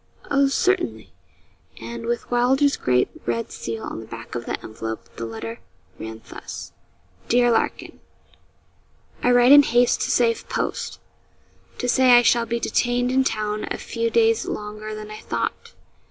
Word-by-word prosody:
'Oh, 280 0 +4
certainly.' 355 +6 0 0.7
And, 235 -1 -7
with 240 +1 -3
Wylder's 265 +4 +3
great 125 0 +1 0.2
red 115 -1 -2
seal 115 -1 -5
on - - -5
the 110 - -10
back 115 0 -9
of 120 -1 -5
the - - -2
envelope, 110 0 -6
the 115 - -5
letter 115 0 -6 0.4
ran 110 0 -8
thus: - - -8 0.6
'DEAR 240 0 +4
LARKIN, 225 - -1 1.2
I - - +2
write 245 +1 +6
in 290 0 +11
haste 245 -2 +2
to - - -1
save 230 -2 +1
post, - - -3 0.8
to 245 - -2
say 255 0 +5
I 240 - +5
shall 235 0 +3
be 235 0 -1
detained 245 +2 +1
in 265 +1 +3
town 215 -3 -2
a - - -3
few 230 0 -2
days 225 0 +2
longer 215 +1 -5
than 215 0 -8
I 215 - -8
thought. - - -4
230 Hz, 155 wpm, -23 LUFS, -, 1.2 s, in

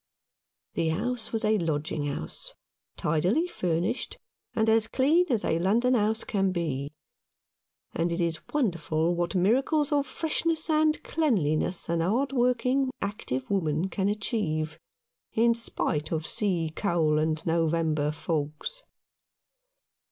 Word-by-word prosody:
The 165 - 0
house 225 +6 -2
was 225 -1 -1
a 215 0 +3
lodging 155 -2 -1
house, 140 - -6 0.4
tidily 180 - +1
furnished, 180 - -2 0.4
and 220 0 +2
as 225 0 +4
clean 310 +10 +3
as 235 -5 +1
a 160 - +1
London 230 +8 +3
house 220 -1 +1
can 195 -2 0
be; 150 -6 -2 1.0
and 170 +1 0
it 170 - -2
is 165 -2 0
wonderful 170 - +1
what 175 +2 -1
miracles 270 - +2
of 285 -2 +2
freshness 320 +3 -1
and 310 0 +2
cleanliness 185 - +1
a 170 0 0
hard 230 +12 +1
working, 250 +1 +2
active 130 -11 -3
woman 170 -2 0
can 195 +1 0
achieve, 200 - -2 0.5
in 235 +1 +4
spite 155 -9 -2
of 160 -1 -1
sea 175 -8 -1
coal 160 -6 +2
and 155 0 -1
November 160 -2 +1
fogs. 155 - -3
190 Hz, 125 wpm, -28 LUFS, 160-240 Hz, 1.0 s, as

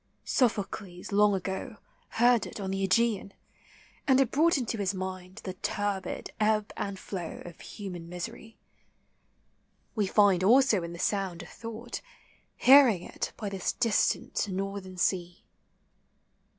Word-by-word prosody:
Sophocles 200 -6 -1
long 205 0 +4
ago 190 +3 -4 0.4
Heard 240 0 +4
it - - -9
on 190 -1 -3
the 195 0 -2
.Ega?an, 200 0 +1 0.7
and 265 -1 +5
it 265 -3 +2
brought 320 +3 +4
Into 235 -4 -2
his 200 -1 0
mind 185 +1 -6
the 185 - -4
turbid 195 0 -3
ebb 215 -1 +1
and 200 -1 -4
flow 180 -3 -6
Of 175 -1 -11
human 180 -5 -8
misery; 180 +5 -7 1.4
we 210 -3 0
Find 195 -3 +4
also 230 -1 +5
in 170 0 -6
the - - -8
sound 185 -1 -1
a - - -11
thought, 230 +5 -7 0.6
Hearing 255 -9 +7
it - - -4
by 215 - -4
this 195 -2 -2
distant 230 -2 +1
northern 195 -1 -4
sea. 180 -1 -1
200 Hz, 135 wpm, -29 LUFS, 185-225 Hz, 1.4 s, Hearing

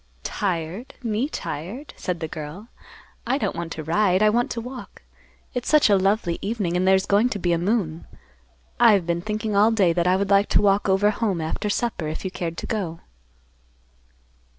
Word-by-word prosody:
"Tired? 185 +3 -3
Me 230 +4 -1
tired?" 220 - -6
said 180 -3 -4
the 160 - -2
girl. 155 +9 -8 0.6
"I 260 +3 +2
don't - - -2
want 170 -1 -5
to 155 - -6
ride. 185 +4 +2
I 215 - +5
want 240 +2 +1
to 230 - -3
walk. 250 +2 -9 0.5
It's 245 -1 -3
such 300 -8 +5
a - - +6
lovely 195 -2 +1
evening, 200 -5 -2
and 185 +1 +1
there's 190 0 +4
going 210 +5 +3
to 205 - -3
be 175 -2 0
a 170 - +1
moon. 175 -4 -1 0.7
I 235 -2 +7
have 195 -4 +2
been 170 0 -1
thinking 215 +1 -3
all 210 +2 +5
day 200 -7 +3
that 175 +1 +1
I 180 - +4
would 200 +1 -1
like 200 +1 +4
to - - +4
walk 200 0 +3
over 200 +2 +3
home 205 -4 -1
after 160 +6 -3
supper, 205 -7 -1
if 155 +5 -5
you 190 - -2
cared 170 -2 -4
to - - -5
go." 180 -7 -3
195 Hz, 195 wpm, -23 LUFS, 170-220 Hz, 0.7 s, I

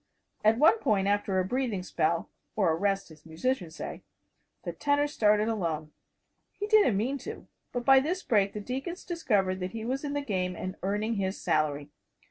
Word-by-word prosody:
At 215 +1 +5
one 320 - +5
point, 200 - +1
after 205 -1 +1
a 185 - +2
breathing 230 -3 -1
spell 170 -2 0 0.3
or 190 -6 +3
a - - +1
rest, 195 0 -1
as 155 -1 -16
musicians 165 +1 -2
say - - -6 0.6
the - - -4
tenor 290 0 +1
started 210 -7 +2
alone. 165 -8 -2 0.6
He 415 - -4
didn't 415 - +4
mean 260 +7 -1
to. - - -8 0.2
But 245 -1 -3
by 270 -1 +8
this 355 +7 -2
break 200 -3 +2
the 210 - -5
deacons 270 - -5
discovered 205 - 0
that 180 0 -4
he 225 -1 -5
was 265 +4 -2
in 290 -1 -3
the 290 - -1
game 185 -8 -2
and 185 +2 -5
earning 210 +4 -1
his 190 0 -2
salary. 150 -3 0
210 Hz, 185 wpm, -29 LUFS, 185-265 Hz, 0.6 s, by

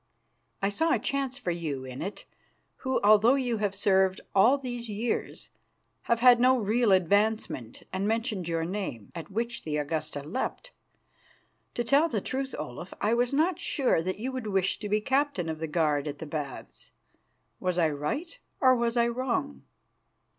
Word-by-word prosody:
I 195 - +3
saw 320 +11 +1
a - - +3
chance 275 -1 -1
for 225 -10 -2
you 150 -6 -4
in 130 0 -7
it, 195 +4 -5 0.5
who, 260 0 -1
although 215 +5 +6
you 245 -4 0
have 205 -2 -1
served 190 -1 +2
all 230 +8 +5
these 245 -3 -5
years, 220 +3 -3 0.6
have 235 0 +2
had 245 -1 +7
no 255 +1 +5
real 225 0 +2
advancement, 190 - +1
and 190 +2 -1
mentioned 220 -5 -1
your 165 -1 0
name, 180 - -5
at 165 +1 -7
which 235 +4 -2
the 150 -1 -2
Augusta 150 -1 -3
leapt. 260 - -4 1.0
To 240 - 0
tell 280 +7 +3
the 225 - 0
truth, 265 +6 -3
Olaf, 125 +9 -7
I 215 +2 +1
was 245 +1 +2
not 320 +5 +1
sure 265 - +1
that 185 +3 -3
you 250 +5 -3
would 255 -4 -5
wish 190 -2 0
to 210 - -5
be 210 +1 +2
captain 265 - 0
of 160 -1 -4
the 160 - -3
guard 150 -2 +1
at 145 0 -4
the 160 - -7
Baths. 145 -3 -6 0.7
Was 180 -1 -1
I 165 -3 +3
right 280 - -4 0.2
or 260 -2 +6
was 235 0 0
I 235 0 +4
wrong?" 235 - -2
210 Hz, 175 wpm, -28 LUFS, 165-250 Hz, 1.0 s, had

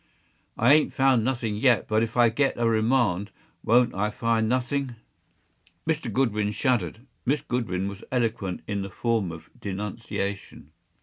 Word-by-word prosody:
I 120 +5 +5
ain’t 155 0 +3
found 130 -4 +3
nothing 120 -4 -1
yet; 120 0 +3
but 110 0 +2
if 115 +1 -2
I 120 -1 +6
get 135 +5 +1
a 120 -1 +1
remand, 110 -4 +2 0.3
won’t 120 +2 +4
I 105 +2 0
find 110 0 0
nothing!” 130 +1 -1 0.9
Mr. 155 -7 -1
Goodwin 105 -4 0
shuddered. 115 - -1 0.2
Miss 140 +3 +1
Goodwin 100 -6 -2
was 100 +1 -7
eloquent 110 -7 -1
in 100 -1 -2
the 95 - -5
form 110 -2 -1
of 80 0 -11
denunciation. 100 -4 -5
115 Hz, 145 wpm, -26 LUFS, 100-125 Hz, 0.9 s, I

